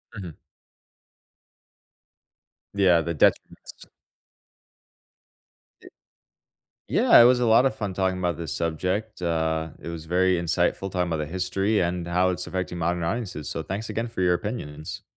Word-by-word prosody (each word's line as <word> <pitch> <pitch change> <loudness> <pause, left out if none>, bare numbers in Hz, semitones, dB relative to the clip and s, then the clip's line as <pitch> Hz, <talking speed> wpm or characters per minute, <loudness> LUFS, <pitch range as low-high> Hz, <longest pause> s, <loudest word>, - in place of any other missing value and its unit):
Mhm. 90 -7 -8 2.4
Yeah, 95 -4 +4
the 85 +1 -3
detriments - - 0 1.9
Ye - - -14 1.0
yeah, - - +6
it - - +9
was 125 +1 +5
a 120 - +2
lotta 115 +4 +5
of 130 - -8
fun 100 -4 -4
talking 95 -1 0
about 90 -2 -1
this 85 -1 -5
subject, 90 +7 -2
uh, 80 -1 -1
it - - -8
was 85 -2 -6
very 90 +2 +2
insightful 85 +3 0
talking 90 -1 -1
about 80 - -1
the 75 - -3
history 95 +5 0
and 85 0 -1
how 90 +2 +2
it's 90 0 -4
affecting 90 -1 -4
modern 85 +1 -1
audiences, 90 - -3
so - - -4
thanks 100 +4 -5
again 115 +1 -2
for 115 - -6
your 90 -1 +3
opinions. 80 -7 -5
90 Hz, 145 wpm, -25 LUFS, 85-100 Hz, 2.4 s, it